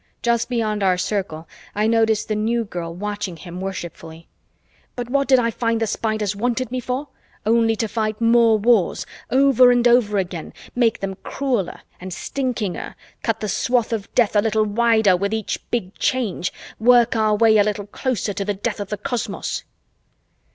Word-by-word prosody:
Just 235 0 +1
beyond 220 -4 -1
our 185 -2 +3
circle, 180 -4 -3 0.3
I 210 +1 +1
noticed 225 -1 +2
the 215 - -1
New 225 +2 0
Girl 175 -5 -5
watching 205 0 -4
him 175 +1 -8
worshipfully. 165 -3 -7 0.7
"But 245 -1 -5
what 280 0 +2
did 265 - +6
I 230 -2 +1
find 230 0 0
the 225 - +1
Spiders 215 -2 -1
wanted 245 +3 -1
me 255 - -1
for? 255 +3 -4 0.4
Only 225 0 +3
to 225 +1 -1
fight 215 0 -2
more 230 -1 +5
wars, 215 -2 +2 0.2
over 260 0 +5
and 245 0 +4
over 235 -4 +3
again, 180 -3 -3 0.2
make 235 -3 +1
them 195 -1 -4
crueler 245 -10 -2 0.2
and 185 +1 -7
stinkinger, 235 -2 -3 0.3
cut 225 -1 -1
the 215 - -2
swath 240 +2 0
of 205 -3 -4
death 230 -4 +3
a 205 - +5
little 220 0 +1
wider 220 -2 +3
with 200 +4 -1
each 220 -2 -3
Big 205 -5 -2
Change, 225 -9 0 0.3
work 240 +1 +5
our 215 -1 +2
way 220 0 +5
a - - +6
little 205 -1 -2
closer 215 -1 -2
to 200 - -3
the 205 0 -2
death 210 +2 -3
of 200 -1 -5
the 210 - -3
cosmos." 245 +3 -3
220 Hz, 175 wpm, -21 LUFS, 200-235 Hz, 0.7 s, did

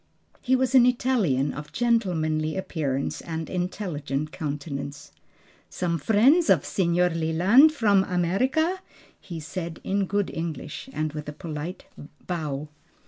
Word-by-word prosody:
He 260 0 +2
was 260 0 +1
an 250 -2 +7
Italian 210 - +1
of 150 0 -8
gentlemanly 170 -10 0
appearance 150 -8 -2
and 160 -1 -5
intelligent 155 -6 -3
countenance. 145 -1 -5 0.6
"Some 170 -2 -2
friends 245 - +4
of - - +4
Signor 180 -1 +2
Leland: 175 - +5
from 205 -9 +3
America?" 255 - +1 0.4
he 170 -4 -7
said 165 +1 -6
in 195 0 0
good 205 0 0
English 165 - -5
and 155 - -2
with 150 -1 -6
a - - -6
polite 160 +2 -6 0.4
bow. 150 -4 -3
170 Hz, 125 wpm, -25 LUFS, 155-205 Hz, 0.6 s, an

